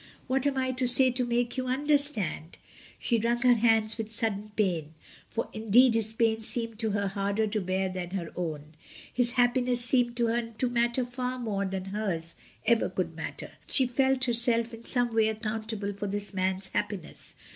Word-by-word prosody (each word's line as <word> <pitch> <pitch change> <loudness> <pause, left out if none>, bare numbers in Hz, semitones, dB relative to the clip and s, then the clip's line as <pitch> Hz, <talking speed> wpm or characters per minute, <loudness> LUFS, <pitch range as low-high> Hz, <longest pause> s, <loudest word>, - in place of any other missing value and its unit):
What 265 +2 0
am 275 -1 -1
I 260 0 0
to 255 0 0
say 255 +1 +6
to 250 +1 0
make 240 +1 -1
you 255 0 -2
understand?" 275 - +2 0.4
She 235 -2 0
wrung 235 +2 0
her 250 -1 +6
hands 225 -1 +2
with 220 -1 -4
sudden 215 -2 0
pain, 165 -7 -1 0.3
for 230 - -3
in 220 0 -7
deed 245 +3 +6
his 220 -1 +2
pain 225 0 0
seemed 230 0 0
to 225 -1 +1
her 200 -1 -1
harder 200 +2 -1
to 215 0 -2
bear 190 +1 -1
than 185 -1 -5
her 180 -3 -5
own, 155 -3 -5 0.4
his 245 -1 +1
happiness 245 -1 +2
seemed 240 -1 +2
to 240 - +2
her 230 0 -2
to 255 - 0
matter 240 +1 +1
far 250 +1 -4
more 210 -5 -2
than 190 -1 -4
hers 190 -5 -3 0.3
could 235 -1 +4
ever 185 0 -1
matter. 160 - -7 0.2
She 265 - +3
felt 265 +1 +1
herself 235 -1 +2
in 230 +1 -11
some 245 -2 +2
way 220 -1 +3
accountable 220 -1 -4
for 200 +1 -5
this 205 +1 -2
man's 190 0 -1
happiness. 195 -6 -4
225 Hz, 190 wpm, -28 LUFS, 200-245 Hz, 0.4 s, say